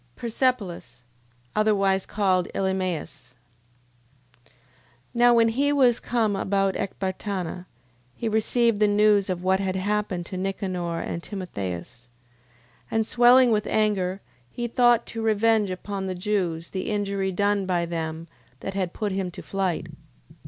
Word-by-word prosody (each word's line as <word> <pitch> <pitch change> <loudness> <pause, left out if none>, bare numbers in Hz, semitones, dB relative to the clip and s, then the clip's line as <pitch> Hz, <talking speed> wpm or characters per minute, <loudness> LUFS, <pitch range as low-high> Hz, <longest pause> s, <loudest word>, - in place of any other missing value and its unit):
Persepolis... 210 - -2 0.5
Otherwise 195 -3 +2
called 190 -4 +1
Elymais. 180 -8 -3 1.1
9:3. - - -28 0.6
Now 240 0 +5
when 230 -1 +5
he 280 +5 +1
was 255 -5 +4
come 225 -4 0
about 195 0 +1
Ecbatana, 185 -2 -4 0.5
he 235 - -3
received 220 0 +2
the 210 - +4
news 205 -1 +3
of 180 -1 -2
what 190 +1 +2
had 190 -1 -1
happened 200 -2 -1
to 185 - -6
Nicanor 185 -3 -3
and 170 - -4
Timotheus. 120 - -6 0.8
9:4. - - -36
And 225 0 +1
swelling 245 +2 +6
with 210 -1 +1
anger, 195 -3 0 0.3
he 240 - -4
thought 240 0 +3
to 225 - -6
revenge 220 -1 +2
upon 190 +1 -4
the 185 - -3
Jews 180 -4 -2
the 185 - -3
injury 200 -2 -1
done 200 +1 +1
by 175 -2 +1
them 165 -1 -4 0.3
that 195 - -4
had 185 -3 -2
put 210 -2 -2
him 190 -1 -2
to 175 - -10
flight. 190 -3 -2
195 Hz, 140 wpm, -25 LUFS, 180-215 Hz, 1.1 s, swelling